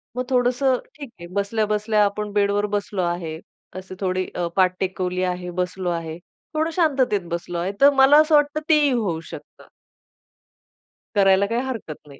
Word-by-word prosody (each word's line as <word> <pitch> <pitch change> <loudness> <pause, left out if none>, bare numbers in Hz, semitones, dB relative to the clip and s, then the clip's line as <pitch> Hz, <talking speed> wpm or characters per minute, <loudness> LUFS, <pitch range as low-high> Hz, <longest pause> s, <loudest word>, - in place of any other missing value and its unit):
मग 250 - -1
थोडंसं 255 +1 +2 0.2
ठीक 285 -3 -9
आहे 170 - -9
बसल्या-बसल्या 210 +1 +1
आपण 210 +1 -3
बेडवर 205 0 +1
बसलो 205 -1 -2
आहे. 170 -2 -3 0.4
असे 185 0 -8
थोडी 185 -1 -1
अ, 175 -1 -1
पाठ 185 -1 +3
टेकवली 185 -1 -2
आहे, 180 -1 -3
बसलो 180 0 -2
आहे, 165 -2 -4 0.4
थोडं 315 +1 0
शांततेत 270 - +2
बसलो 170 0 -4
आहे. 175 +3 -2
तर 280 - +9
मला 275 +2 +7
असं 310 0 +3
वाटतं 295 +1 +2
तेही 300 -3 +4
होऊ 205 -10 -1
शकतं. - - -12 1.5
करायला 195 -1 +4
काही 230 +4 -1
हरकत 195 - -7
नाही. 140 -1 -14
200 Hz, 160 wpm, -22 LUFS, 180-250 Hz, 1.5 s, तर